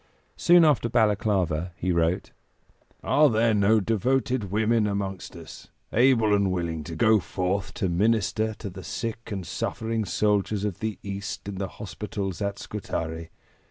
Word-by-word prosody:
Soon 175 -1 +6
after 140 -6 +3
Balaklava 95 -7 +1
he 90 +1 -1
wrote: 85 +1 0 0.7
"Are 150 0 +4
there 115 0 +2
no 105 +2 +4
devoted 120 +2 0
women 110 +2 +2
amongst 100 -2 -4
us, - - -11 0.3
able 115 -3 +4
and 100 -2 +2
willing 85 -3 -2
to 80 - -6
go 110 +4 +4
forth 95 +2 -2
to 95 - -1
minister 110 +3 +1
to 100 -2 -7
the 95 +1 -9
sick 115 +2 -5
and 95 -3 -4
suffering 110 +3 -2
soldiers 105 0 +1
of 100 -4 -3
the 110 -3 -3
East 100 0 -5
in 100 -2 -5
the 95 - -2
hospitals 100 -3 -5
at 100 0 -2
Scutari? 80 -6 -5
105 Hz, 150 wpm, -26 LUFS, 95-110 Hz, 0.7 s, Soon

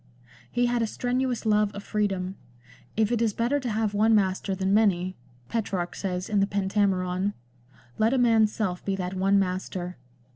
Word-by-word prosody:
He 245 +1 +2
had 240 0 +1
a 225 - +1
strenuous 250 +1 -1
love 210 -1 +3
of 200 - -6
freedom; 195 -4 -1 0.6
if 220 0 +2
it 235 -2 +1
is 225 -3 +2
better 245 +5 +1
to 255 -3 -3
have 215 -1 0
one 220 +2 +4
master 190 -1 +1
than 190 +1 0
many, 185 -4 +2 0.3
Petrarch 190 - -2
says 180 -2 -3
in 210 -2 +1
the 195 - +3
Pentameron, 195 -1 0 0.6
let 220 +1 +4
a 265 - +2
man's 225 -3 +4
self 185 -6 -2
be 195 - -1
that 185 -1 -3
one 195 +1 +2
master. 185 -1 -2
205 Hz, 175 wpm, -26 LUFS, 190-225 Hz, 0.6 s, one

